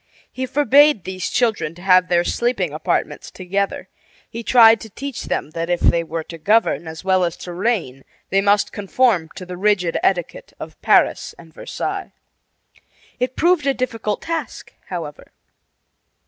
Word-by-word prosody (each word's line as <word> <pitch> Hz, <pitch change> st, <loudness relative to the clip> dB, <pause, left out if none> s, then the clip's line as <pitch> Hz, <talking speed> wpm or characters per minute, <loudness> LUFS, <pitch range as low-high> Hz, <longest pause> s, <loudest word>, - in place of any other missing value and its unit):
He 260 Hz, 0 st, -4 dB
forbade 285 Hz, -, +4 dB
these 185 Hz, +1 st, -4 dB
children 220 Hz, -9 st, 0 dB
to 175 Hz, -, -14 dB
have 185 Hz, -1 st, +5 dB
their 175 Hz, -1 st, +2 dB
sleeping 200 Hz, -, -1 dB
apartments 155 Hz, -, -2 dB
together. 195 Hz, +2 st, -3 dB, 0.4 s
He 230 Hz, -, -7 dB
tried 230 Hz, -1 st, +6 dB
to 220 Hz, -, -9 dB
teach 275 Hz, +5 st, -6 dB
them 150 Hz, -, -3 dB
that 165 Hz, +1 st, -4 dB
if 175 Hz, -1 st, +1 dB
they 170 Hz, -1 st, +2 dB
were 165 Hz, 0 st, -5 dB
to 165 Hz, +1 st, -11 dB
govern 210 Hz, -2 st, +1 dB
as 160 Hz, +1 st, -8 dB
well 185 Hz, -1 st, +2 dB
as 170 Hz, -1 st, -2 dB
to 175 Hz, -, -8 dB
reign 175 Hz, -, -2 dB, 0.3 s
they 195 Hz, +1 st, +3 dB
must 200 Hz, 0 st, +2 dB
conform 205 Hz, -4 st, +1 dB
to 185 Hz, -, -8 dB
the 180 Hz, 0 st, -8 dB
rigid 190 Hz, -3 st, +1 dB
etiquette 175 Hz, -3 st, -2 dB
of -, -, -10 dB
Paris -, -, +2 dB
and 165 Hz, -2 st, -16 dB
Versailles. -, -, -5 dB, 1.1 s
It 255 Hz, +1 st, -2 dB
proved 340 Hz, -4 st, +2 dB
a 275 Hz, -, +2 dB
difficult 225 Hz, -4 st, -3 dB
task, 330 Hz, -1 st, -5 dB
however. -, -, -7 dB
195 Hz, 160 wpm, -20 LUFS, 175-240 Hz, 1.1 s, tried